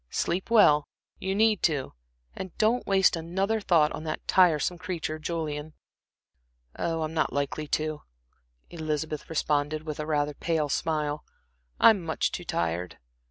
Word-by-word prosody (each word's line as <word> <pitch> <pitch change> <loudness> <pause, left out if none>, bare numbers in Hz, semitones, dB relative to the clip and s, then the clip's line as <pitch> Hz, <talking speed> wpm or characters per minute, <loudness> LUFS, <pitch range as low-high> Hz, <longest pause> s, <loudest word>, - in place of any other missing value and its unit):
"Sleep 180 +5 -1
well 150 -11 +5 0.3
you 190 +1 -2
need 215 -1 +3
to 145 -6 0 0.4
and 185 - -7
don't 225 +3 +2
waste 190 -2 +4
another 190 +7 -1
thought 165 -6 +3
on 155 - -6
that 155 - -4
tiresome 175 -1 +3
creature, 165 -4 -4
Julian." 155 -2 -4 1.0
"Oh, 165 -1 -1
I'm 155 +1 -4
not 155 -1 +1
likely 145 +2 -2
to," 155 0 -1 0.7
Elizabeth 155 -2 -3
responded, 150 -1 0
with 155 -2 -5
rather 150 -1 0
a - - -11
pale 155 -1 -1
smile. 150 -1 -1 0.6
"I'm 215 -5 +6
much 160 -1 -1
too 180 - -5
tired." 85 - -2
155 Hz, 140 wpm, -27 LUFS, 150-180 Hz, 1.0 s, I'm